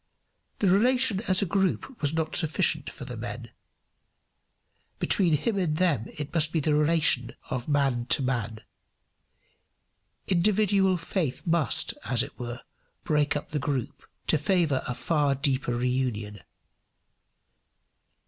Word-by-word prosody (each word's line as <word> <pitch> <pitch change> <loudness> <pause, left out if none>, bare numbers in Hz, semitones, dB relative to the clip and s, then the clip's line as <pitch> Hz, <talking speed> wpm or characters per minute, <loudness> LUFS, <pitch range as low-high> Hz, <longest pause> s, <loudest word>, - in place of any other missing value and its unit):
The - - -1
relation 230 +2 +3
as 185 +2 +3
a - - 0
group 195 +7 -1
was 145 -1 +2
not 160 -1 -2
sufficient 160 -3 +2
for - - -9
the - - -7
men. - - -7 1.5
Between 170 -6 +3
him 200 +7 -1
and 155 -5 0
them 155 - +1
it 150 0 -5
must 160 -2 +2
be 165 - +1
the 150 0 +1
relation 150 -5 +2 0.2
of 125 -2 -3
man 135 -5 +1
to 135 - +2
man. 115 -4 -2 1.7
Individual 195 0 +2
faith 165 -4 -3
must, 165 -4 +1
as 125 -1 +2
it - - -10
were, 120 0 -6 0.4
break 150 -1 +1
up 145 - -5
the 150 - -1
group 130 -2 -3 0.2
to 155 - +2
favour 160 -4 +1
a 125 - -3
far 145 -2 +1
deeper 130 -3 0
reunion. 120 -5 -2
150 Hz, 130 wpm, -27 LUFS, 130-180 Hz, 1.7 s, relation